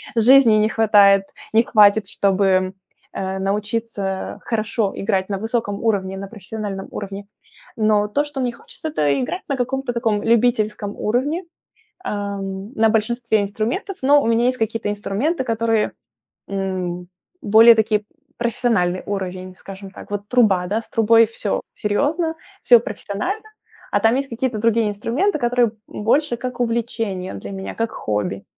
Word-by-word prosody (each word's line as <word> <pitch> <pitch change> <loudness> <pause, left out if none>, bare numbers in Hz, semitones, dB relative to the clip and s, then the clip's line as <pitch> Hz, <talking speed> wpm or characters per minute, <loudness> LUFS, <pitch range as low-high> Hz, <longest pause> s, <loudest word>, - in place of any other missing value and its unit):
жизни 240 0 +6
не 215 - +2
хватает 205 -3 +5 0.3
не 225 - +5
хватит, 210 -2 +5
чтобы, 190 -1 +1 0.4
э, 190 0 -3
научиться 205 -1 -3
хорошо 220 -2 -1
играть 190 0 -1
на 195 -1 -2
высоком 225 -2 -2
уровне, 195 -3 0
на 195 0 -6
профессиональном 205 -1 -6
уровне. 200 0 -6 0.5
Но 210 -1 +2
то, 285 +8 0
что 290 -2 -5
мне 245 -1 0
хочется- 315 +6 -8
это 145 - +1
играть 360 +9 -3
на 275 - +1
каком-то 255 0 -2
таком 225 -3 0
любительском 215 -3 +1
уровне, 280 - -1 0.6
эм, 200 0 -4
на 225 0 +4
большинстве 225 0 +1
инструментов, 225 - -3
но 285 +2 +5
у - - -1
меня 230 +1 +2
есть 255 0 0
какие-то 225 -1 -1
инструменты, 215 - -1
которые, 225 -2 0 0.6
м, 185 -2 -3 0.3
более 225 +3 +7
такие, 215 -1 +1 0.4
профессиональный 220 -6 0
уровень, 185 -2 -4
скажем 195 0 -10
так. - - -12
Вот 205 0 -4
труба, 205 -8 +3
да, 205 - -2
с - - -14
трубой 225 +1 +5
всё 215 -2 -3
серьезно, 300 +10 0 0.3
всё 240 -2 +7
профессионально, 350 - -4 0.5
а - - +2
там 225 +3 +3
есть 275 0 -2
какие-то 235 -1 -2
другие 230 +1 +2
инструменты, 245 - -1
которые, 245 -1 +2 0.2
м, 210 - -7
больше 240 +1 +2
как 250 0 -6
увлечение 225 -5 -2
для - - -7
меня, 190 0 -6
как 230 0 -1
хобби. 105 -2 -3
215 Hz, 145 wpm, -21 LUFS, 195-235 Hz, 0.6 s, более